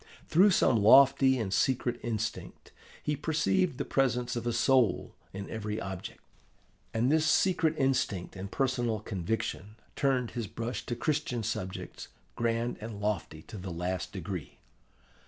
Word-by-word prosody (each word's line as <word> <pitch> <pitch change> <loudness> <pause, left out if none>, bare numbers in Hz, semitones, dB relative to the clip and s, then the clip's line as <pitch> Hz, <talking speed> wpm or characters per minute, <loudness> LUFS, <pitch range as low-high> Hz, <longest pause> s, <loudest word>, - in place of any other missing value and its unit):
Through 190 +6 +5
some 135 - +4
lofty 135 +3 +6
and 105 -5 -2
secret 125 -2 +1
instinct 115 -1 -4 0.3
he 150 - 0
perceived 160 +1 +1
the - - -2
presence 125 -2 0
of 120 0 -3
a - - +2
soul 125 -4 +2 0.2
in 100 +1 -6
every 105 -1 -4
object. 95 -1 -7 0.7
And 120 +4 +1
this 160 0 +3
secret 175 -4 +3
instinct 130 - 0
and 95 +1 -6
personal 120 -5 0
conviction 105 +1 -3 0.2
turned 130 -4 +1
his 115 -3 -4
brush 115 +5 -4
to 120 - -2
Christian 145 -3 -1
subjects, 95 -4 -5 0.3
grand 115 +1 -1
and 110 -2 -6
lofty 95 -7 -3
to 105 - -9
the 95 +1 -6
last 90 +2 -3
degree. - - -6
120 Hz, 140 wpm, -30 LUFS, 105-135 Hz, 0.7 s, lofty